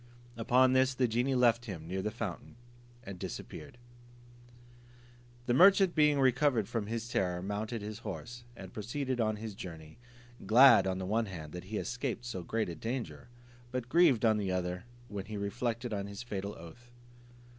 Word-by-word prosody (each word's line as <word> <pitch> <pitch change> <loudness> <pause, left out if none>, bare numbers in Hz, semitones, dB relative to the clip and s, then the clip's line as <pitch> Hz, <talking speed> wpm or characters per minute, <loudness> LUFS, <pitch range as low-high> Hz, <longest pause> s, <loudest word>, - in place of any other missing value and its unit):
Upon 125 +3 +4
this 130 0 +3
the 125 -1 +2
genie 120 +4 0
left 120 -1 +3
him 85 -8 -7
near 95 +2 -2
the 105 - -1
fountain, 105 - -6 0.5
and 100 -5 -8
disappeared. - - -7 1.7
The 120 - +1
merchant 190 +4 +6
being 150 -2 +4
recovered 130 -4 +3
from 110 -4 -3
his 115 +1 -3
terror, 90 -6 -1
mounted 105 +3 -3
his 105 +1 -6
horse, 120 +1 -7
and 95 -5 -10
proceeded 125 +3 -2
on 110 -1 +1
his 110 0 -6
journey, 80 -3 -10 0.4
glad 125 -2 +7
on 95 -1 -1
the 95 - -4
one 110 +3 0
hand 80 -6 -8
that 90 +2 -8
he 105 +3 -6
had - - -2
escaped 125 -1 -3
so 115 -6 -4
great 110 +5 -2
a - - -4
danger, 120 - -5 0.4
but 125 -1 -4
grieved 140 -8 +4
on 110 -1 +4
the 100 -3 -1
other, 90 +2 -2 0.2
when 100 -4 -6
he 105 0 -6
reflected 115 +3 -3
on 100 -1 -3
his 100 +3 -7
fatal 100 -3 -5
oath. 100 +9 -13
115 Hz, 175 wpm, -32 LUFS, 100-125 Hz, 1.7 s, glad